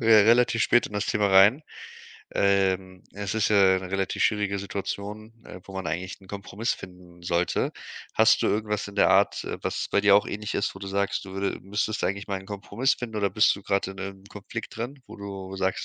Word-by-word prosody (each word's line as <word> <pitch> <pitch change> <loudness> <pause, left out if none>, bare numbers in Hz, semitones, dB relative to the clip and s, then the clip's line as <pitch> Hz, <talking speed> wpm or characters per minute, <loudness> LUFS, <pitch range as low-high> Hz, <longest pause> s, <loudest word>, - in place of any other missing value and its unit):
re 110 -3 +6
relativ 115 0 +4
spät 120 - +3
in 105 - -11
das 105 - 0
Thema 105 -2 +1
rein 100 +9 +6 0.7
ähm, 95 -2 +1
es 100 +1 -4
ist 110 - +2
ja 95 -3 +5
'ne 95 -1 -8
relativ 95 0 -1
schwierige 105 -2 +1
Situation, 100 +2 -5
äh, 90 - -10
wo 95 - -12
man 95 -2 -5
eigentlich 90 +5 -4
'n 95 - -17
Kompromiss 100 +4 -3
finden 90 -1 -13
sollte. 85 +1 0 0.4
Hast - - +4
du - - +2
irgendwas 105 -1 -1
in 100 - -11
der - - +5
Art, 95 +2 +3
äh, - - -4
was - - -2
bei 100 - +3
dir 100 -1 +7
auch 105 - +2
ähnlich 105 +1 -5
ist, 100 - -1
wo - - -9
du 100 - -6
sagst, 100 +1 -1
du 95 - -10
würde 95 +1 -2
müsstest 105 +3 -2
eigentlich 100 +1 -2
mal 100 -2 -2
'n 95 - -14
Kompromiss 105 +6 -1
finden, 115 -3 -6
oder 100 -1 +1
bist 110 - +4
du 100 - -11
grad 100 0 0
in 95 - -7
'nem 95 0 -7
Konflikt 105 +3 -8
drin, 120 +5 -5
wo - - -11
du 95 -1 -7
sagst, 95 0 -1
100 Hz, 220 wpm, -26 LUFS, 95-105 Hz, 0.7 s, dir